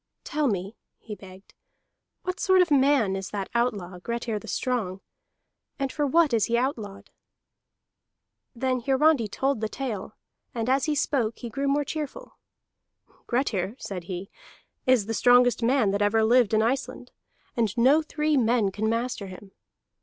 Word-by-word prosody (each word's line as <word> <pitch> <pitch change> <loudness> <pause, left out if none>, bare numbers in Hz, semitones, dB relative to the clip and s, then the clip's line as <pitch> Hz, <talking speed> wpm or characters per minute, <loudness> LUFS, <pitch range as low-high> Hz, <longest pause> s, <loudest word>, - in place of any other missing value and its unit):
"Tell 300 -1 0
me," 195 -1 -2 0.2
he 215 - -9
begged, 190 -1 -13 0.7
"what 365 0 -4
sort 375 -1 +5
of 345 - -6
man 270 -8 +3
is 190 0 -5
that 200 -2 -4
outlaw 205 -7 -1
Grettir 235 +1 -3
the - - -13
Strong, 215 -8 -2 0.8
and 275 -1 -2
for 295 -2 -1
what 315 -1 +3
is 220 -3 +3
he 235 - +1
outlawed?" 225 -6 -3 1.4
Then 255 +1 0
Hiarandi 270 -1 +3
told 265 +3 -1
the 220 - -1
tale, 215 -6 -5 0.4
and 230 -1 -2
as 270 +2 +2
he 305 -1 0
spoke 240 -6 0
he 235 - -7
grew 275 +3 -2
more 285 +1 +1
cheerful. 310 - -6 0.9
"Grettir," 225 -6 -1
said 180 -8 -6
he, 185 +1 -6 0.6
"is 255 -5 +4
the 225 - -3
strongest 245 +2 +4
man 235 -3 +2
that 200 +1 -1
ever 215 +2 +3
lived 235 -1 +4
in 215 - +3
Iceland, 260 +4 -2 0.4
and 230 -1 0
no 270 +7 +5
three 305 0 -1
men 230 -5 +2
can 215 +3 -1
master 230 -3 -2
him. 190 +1 -11
235 Hz, 155 wpm, -26 LUFS, 205-275 Hz, 1.4 s, sort